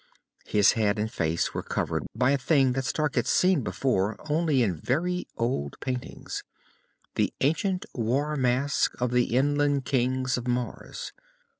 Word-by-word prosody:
His 105 -2 +5
head 105 -2 +1
and 110 +1 -1
face 80 -3 -1
were - - -2
covered - - -2
by 125 +1 +3
a 140 - +3
thing 135 -1 +3
that 130 +1 -2
Stark 150 +3 0
had 120 - 0
seen 180 -5 +3
before 110 -5 0 0.2
only 155 -5 +2
in 95 -6 0
very 180 +7 -1
old 115 - -2
paintings 125 -1 -5 0.7
the - - +1
ancient 180 +6 +1
war 135 +6 0
mask 135 +2 +1
of 125 -1 0
the 125 -1 +2
inland 145 0 +2
Kings 130 0 +1
of 125 - -7
Mars. 125 0 -3
130 Hz, 150 wpm, -27 LUFS, 120-145 Hz, 0.7 s, His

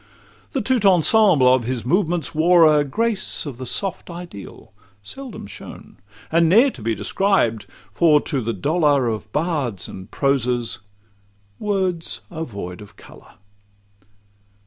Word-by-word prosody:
The 265 - -1
'tout 250 -1 +1
ensemble' 180 - +5
of 130 -3 +1
his 125 -1 -3
movements 175 +1 0
wore 165 +2 +5
a 150 -1 +4
Grace 210 - -1
of 140 -5 -7
the 130 - -5
soft 195 +8 -2
ideal, 170 - -10 0.3
seldom 260 - -9
shown, 100 - -12 0.3
And 165 0 +3
ne'er 235 +9 +5
to 125 - -13
be 110 +1 -1
described; 115 - 0 0.3
for 155 +3 +4
to 140 -5 -2
the 115 0 -2
dolour 145 - +1
Of 110 -2 -4
bards 145 - -2
and 95 0 -10
prosers, 125 -5 -1 0.8
words 190 -5 -2
are 165 -1 -4
void 95 - -8
of 105 0 -14
colour. - - -17
150 Hz, 135 wpm, -21 LUFS, 115-180 Hz, 0.8 s, ensemble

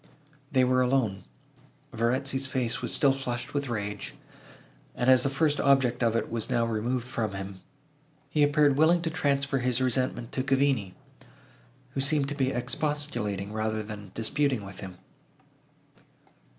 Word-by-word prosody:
They 130 -2 +4
were 130 0 +3
alone. 125 -7 0 0.7
Verezzi's 130 +3 0
face 125 -2 -1
was - - -1
still 140 -2 +4
flushed 125 -3 -3
with 140 -2 -2
rage; 105 -3 -4 0.8
and, 125 - -1
as 130 -1 +6
the 135 - +2
first 145 +1 +1
object 130 -3 +3
of 115 -2 +2
it 115 - -1
was 115 -1 -2
now 115 -1 +2
removed 115 +2 -2
from 115 -5 -2
him, 95 0 -7 0.7
he 150 - 0
appeared 145 -1 +4
willing 165 +3 +4
to 165 - -1
transfer 140 -2 0
his 125 0 +1
resentment 130 -1 -1
to 130 - -1
Cavigni, 135 -8 +1 1.0
who 135 - -2
seemed 140 0 +2
to 145 - -4
be 135 -2 +1
expostulating, 120 -8 -2
rather 110 0 -1
than 105 -2 -9
disputing, 130 0 0
with 95 -1 -9
him. 95 -2 -8
130 Hz, 150 wpm, -28 LUFS, 110-140 Hz, 1.0 s, as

